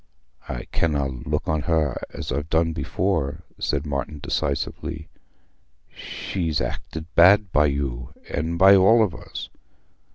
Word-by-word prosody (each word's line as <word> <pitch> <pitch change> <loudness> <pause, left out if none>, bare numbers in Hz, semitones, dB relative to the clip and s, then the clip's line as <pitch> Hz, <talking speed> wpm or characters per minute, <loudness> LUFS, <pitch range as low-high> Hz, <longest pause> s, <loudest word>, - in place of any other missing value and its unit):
"I - - -4
canna 70 -4 0
look 65 -2 -3
on 80 -1 +1
her 75 -3 0
as - - -6
I've 75 +4 -2
done 80 +1 +2
before," 80 -6 -1 0.2
said 70 0 -1
Martin 70 +1 -3
decisively. 75 +2 -3 0.9
"She's 80 -5 -3
acted 80 -1 -5
bad 95 +3 +6
by 75 -1 +4
you, 70 -4 -3 0.2
and 80 +3 -2
by 95 +2 +8
all 110 +4 +6
of 100 -6 -1
us. - - -8
80 Hz, 130 wpm, -24 LUFS, 70-85 Hz, 0.9 s, by